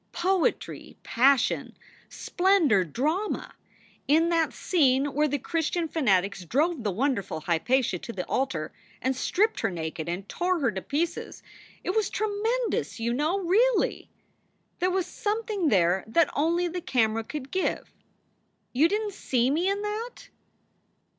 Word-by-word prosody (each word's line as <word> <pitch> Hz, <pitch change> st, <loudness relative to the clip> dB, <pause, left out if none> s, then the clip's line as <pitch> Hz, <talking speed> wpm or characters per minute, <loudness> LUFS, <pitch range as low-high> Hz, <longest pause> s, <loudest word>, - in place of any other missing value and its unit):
Poetry, 360 Hz, 0 st, -1 dB
passion, 265 Hz, +2 st, +2 dB, 0.3 s
splendor, 350 Hz, -, +2 dB
drama. 305 Hz, -, -2 dB, 0.5 s
In 320 Hz, +4 st, +4 dB
that 330 Hz, -2 st, +2 dB
scene 275 Hz, -6 st, +2 dB
where 300 Hz, +2 st, +2 dB
the 290 Hz, 0 st, -1 dB
Christian 330 Hz, +4 st, -1 dB
fanatics 200 Hz, -, +1 dB
drove 290 Hz, -, 0 dB
the 210 Hz, -, 0 dB
wonderful 205 Hz, -, -1 dB
Hypatia 185 Hz, +5 st, +1 dB
to 235 Hz, -, -7 dB
the 185 Hz, -5 st, -5 dB
altar 175 Hz, -13 st, -2 dB, 0.3 s
and 260 Hz, +1 st, 0 dB
stripped 425 Hz, -, +1 dB
her -, -, 0 dB
naked 160 Hz, -2 st, -5 dB
and 185 Hz, +3 st, -4 dB
tore 360 Hz, +7 st, 0 dB
her 265 Hz, -6 st, +1 dB
to 190 Hz, -, -5 dB
pieces 330 Hz, -, -3 dB, 0.4 s
it -, -, -1 dB
was 425 Hz, 0 st, +1 dB
tre 435 Hz, -, -1 dB
mendous, 450 Hz, +4 st, -1 dB
you 235 Hz, +1 st, -1 dB
know; 310 Hz, +9 st, 0 dB
really! 440 Hz, +7 st, +2 dB, 0.7 s
There 365 Hz, -, +2 dB
was 370 Hz, -1 st, 0 dB
something 415 Hz, -1 st, -2 dB
there 185 Hz, -2 st, +3 dB
that 310 Hz, +8 st, +3 dB
only 340 Hz, +4 st, +1 dB
the 350 Hz, +1 st, -4 dB
camera 225 Hz, -9 st, +1 dB
could 275 Hz, +2 st, -7 dB
give. 375 Hz, -, -2 dB, 0.8 s
You 285 Hz, +6 st, +4 dB
didn 420 Hz, +2 st, -1 dB
t -, -, -15 dB
see 250 Hz, -5 st, +1 dB
me 340 Hz, +6 st, +1 dB
in 400 Hz, +1 st, -1 dB
that 435 Hz, +4 st, -5 dB
305 Hz, 145 wpm, -27 LUFS, 235-370 Hz, 0.8 s, In